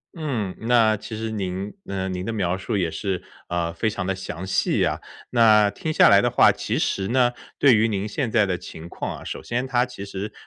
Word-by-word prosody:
嗯， 125 - -3
那 115 -2 +3
其 110 +1 -7
实 110 0 -3
您， 95 -1 -4
呃， 95 -1 -3
您 90 -1 -4
的 115 - -3
描 95 -5 0
述 100 +3 -3
也 85 -4 0
是， 95 -1 -3 0.3
呃， 85 -1 -1
非 110 +6 0
常 100 -3 -4
地 95 - 0
详 95 -1 -6
细 95 - +1
啊。 - - -2 0.3
那 110 -4 +5
听 155 +9 -4
下 - - +6
来 - - +7
的 - - +2
话， - - +5
其 - - -3
实 95 - -1
呢， 120 +1 +3 0.3
对 135 -4 +6
于 110 +1 +3
您 100 -2 -2
现 120 +3 -2
在 105 -2 +4
的 95 -2 -1
情 80 +1 -10
况 - - -5
啊， - - -11
首 - - -6
先 125 +2 -2
它 125 -1 +1
其 120 -5 -8
实 100 +1 -5
105 Hz, 240 characters per minute, -23 LUFS, 95-115 Hz, 0.3 s, 来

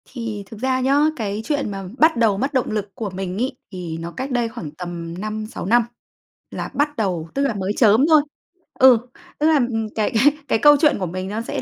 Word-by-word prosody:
Thì 230 -5 -5
thực 210 +2 -11
ra 260 +1 0
nhá, 275 +2 +3 0.2
cái 210 -4 -3
chuyện 285 -2 -1
mà 195 -1 -5
bắt 315 -2 +4
đầu 220 -4 +3
mất 270 +7 -2
động 260 -2 0
lực 205 -2 -3
của 215 -3 -4
mình 185 0 -5
ấy, 255 +3 -2
thì 175 -4 -6
nó 165 +1 -6
cách 265 +8 -5
đây 240 -2 0
khoảng 160 -9 -7
tầm 170 0 -7
5-6 215 -1 -5
năm 235 +5 +4 0.7
là - - -5
bắt 295 +1 0
đầu, 180 -6 -2
tức 275 - 0
là 265 - -2
mới 200 0 -2
chớm 225 +3 +5
thôi. 310 -2 +6 0.6
Ừ, 260 -2 +8 0.4
tức 300 - +3
là, 320 - +4
ừm, 235 -5 0
cái 215 +1 0
cái 280 +7 +4
cái 225 - +1
câu 295 +5 +7
chuyện 300 -8 +3
của 185 - -1
mình 185 +2 -5
nó 210 +3 -3
sẽ 230 - -4
220 Hz, 225 wpm, -21 LUFS, 195-260 Hz, 0.7 s, Ừ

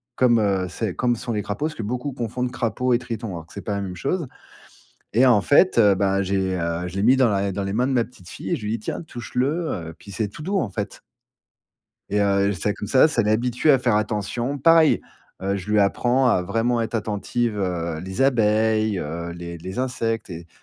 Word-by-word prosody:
comme, 120 -2 +4
heu, 100 -3 +1
c'est 95 0 -3
comme 120 -1 +1
sont 120 +2 -5
les 105 - -1
crapauds, 105 +10 -3
parce 155 -1 -3
que 115 - -5
beaucoup 125 +6 -3
confondent 125 0 -3
crapaud 125 +1 0
et 120 - +3
triton, 115 -2 -5
alors 85 -3 -7
que - - -17
c'est 100 - -6
pas 105 - -3
la 100 - -2
même 95 -2 -5
chose 150 - -2 0.9
et 130 +3 +6
en 120 -5 +5
fait, 145 - +4
heu, 105 -3 +6
bah, 95 0 +1
j'ai, 95 -1 0
heu, 85 +1 -2
je 90 - -10
l'ai 95 - 0
mis 130 +4 +6
dans 130 -2 +4
la 100 -1 0
dans 100 - -3
les 95 - -3
mains 120 +5 +1
de 135 - 0
ma 125 -2 +3
petite 95 -8 -16
fille 95 - -7
et - - +2
je 110 - -8
lui 105 - -2
dis: 115 - -1
«Tiens, 110 - -4
touche-le 125 -3 -3 0.2
heu» 80 -1 -5
puis 100 - -13
c'est 110 +2 -1
tout 105 - -11
doux, 195 +5 0
en 120 - -1
fait - - -5 1.1
et 105 - +1
heu, 100 0 +2
ça 105 +3 -1
comme 105 - -6
ça, 130 +7 +5
ça 145 -7 +1
l'habitue 120 +6 +1
à 135 - +6
faire 120 -4 +2
attention. 110 +5 -1
Pareil, 165 +2 +5 0.4
heu, 100 +1 0
je 95 +2 -8
lui 105 - +4
apprends 120 +6 +2
à 105 - +3
vraiment 115 +6 0
être 115 +1 -3
attentive, 110 +1 -1
heu, 85 -4 -2
les 95 +6 -4
abeilles, 110 -4 +2
heu, 85 +3 -4
les 85 0 -7
les 95 +7 -6
insectes 115 -4 -2
et 85 -1 -8
110 Hz, 235 wpm, -23 LUFS, 95-125 Hz, 1.1 s, et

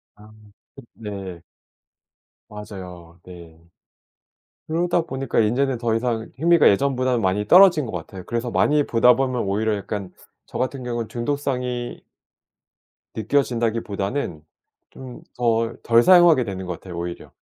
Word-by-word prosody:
아 105 +1 -17 0.4
그 135 - -11
네. 95 -5 -8 1.1
맞아요. 90 -5 -10
네. 85 -3 -13 1.1
그러다 170 +2 0
보니까 135 -6 -3
인제는 125 +4 +1
더 115 -1 -1
이상 115 -1 -2
흥미가 170 +1 +4
예전보다는 130 +2 +1
많이 100 +2 0
떨어진 180 - +6
것 115 - -6
같아요. 90 +2 -7
그래서 120 +1 -3
많이 150 +3 +2
보다 120 +1 +4
보면 130 -1 -1
오히려 105 +2 0
약간 100 -1 -6 0.3
저 - - -8
같은 130 +1 -3
경우는 120 -2 -3
중독성이 125 -1 -3 1.1
느껴진다기보다는 115 - -2 0.5
좀 130 -2 -11 0.2
덜 115 -1 0
덜 115 0 +4
사용하게 175 -6 +6
되는 95 -4 -6
것 90 - -4
같아요 85 +1 -10
오히려. 85 0 -6
115 Hz, 290 characters per minute, -22 LUFS, 100-130 Hz, 1.1 s, 떨어진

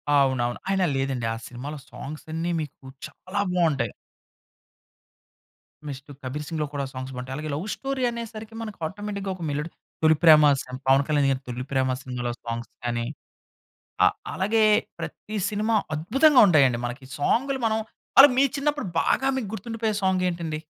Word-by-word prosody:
అవునవును. 130 -4 +2
అయినా 190 -1 +2
లేదండి, 135 -3 -1
ఆ - - -4
సినిమాలో 140 +5 -7
సాంగ్స్ 150 +2 -8
అన్ని 165 +2 -1
మీకు 145 -2 -9 0.2
చాలా 195 +3 -4
బాగుంటాయి. 150 - +1 2.0
నెక్స్ట్ 140 +1 -8
'కబీర్ 145 +4 -4
సింగ్‌లో' 155 -3 -2
కూడా 140 -1 -2
సాంగ్స్ 130 0 -6
బాగుంటాయి. 125 +1 -5
అలాగే 155 0 -4
లవ్ 175 +8 -4
స్టోరీ 270 -1 -3
అనేసరికి 225 -1 -7
మనకు 215 -2 -6
ఆటోమేటిక్‌గా 200 +1 -5
ఒక 175 - -8
మెలోడీ 150 +3 -2 0.3
'తొలి 160 0 +6
ప్రేమ' 155 -2 +8 0.2
సమ్ 125 0 -8
పవన్ 135 +1 +5
కళ్యాణ్ 145 -3 +2
గారి 135 0 -1
'తొలి 125 +1 -4
ప్రేమ' 130 -1 +1
సినిమాలో 125 -2 -3
సాంగ్స్ 115 0 -4
కానీ, 120 0 -1 1.0
అ - - +7 0.3
అలాగే 215 +4 +2 0.4
ప్రతి 215 - -6
సినిమా 215 +2 +1 0.2
అద్భుతంగా 265 - +5
ఉంటాయండి 135 -8 +4
మనకి 125 +2 -7
సాంగులు 265 - +1
మనం 220 0 +1 0.4
అలా 275 +1 +12
మీ 275 - +6
చిన్నప్పుడు 295 -3 -1
బాగా 265 - +2
మీకు 240 -6 -3
గుర్తుండిపోయే 220 0 -2
సాంగ్ 190 -1 +2
ఏంటండి? 165 -3 -3
155 Hz, 150 wpm, -25 LUFS, 135-215 Hz, 2.0 s, అలా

